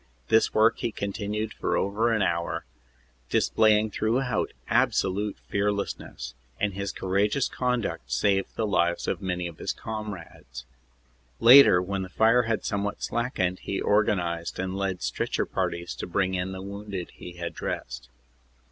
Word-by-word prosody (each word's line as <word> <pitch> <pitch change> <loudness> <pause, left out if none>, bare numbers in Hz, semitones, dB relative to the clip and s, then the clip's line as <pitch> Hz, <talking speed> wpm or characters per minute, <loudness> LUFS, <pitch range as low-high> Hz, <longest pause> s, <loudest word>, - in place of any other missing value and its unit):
This 110 0 +4
work 110 +1 +3
he 115 - -1
continued 105 +2 -3
for - - -1
over 110 +4 +1
an 110 -3 +2
hour, 85 -2 -1 0.6
displaying 110 -1 +3
throughout 125 +5 0 0.2
absolute 100 +2 +1
fearlessness, 100 -11 -2 0.3
and 105 -1 0
his 100 0 -3
courageous 100 +7 +1
conduct 120 - -2
saved 95 +8 +1
the 110 - 0
lives 85 -4 +1
of - - -1
many 90 -2 -2
of 85 -2 -7
his - - -2
comrades. 95 - -7 0.7
Later, 120 -7 +8
when 100 +1 -2
the 95 - -5
fire 115 +6 +4
had 115 -2 -2
somewhat 100 0 -2
slackened, 95 -7 -1
he 100 - -3
organized 90 -5 +1
and 95 0 -3
led 95 -4 -2
stretcher - - -1
parties 85 0 -2
to - - -5
bring 95 +1 0
in 90 +1 -1
the 95 0 -6
wounded 100 -2 -6
he 90 - -10
had 85 -1 -5
dressed. - - -5
100 Hz, 145 wpm, -27 LUFS, 90-110 Hz, 0.7 s, Later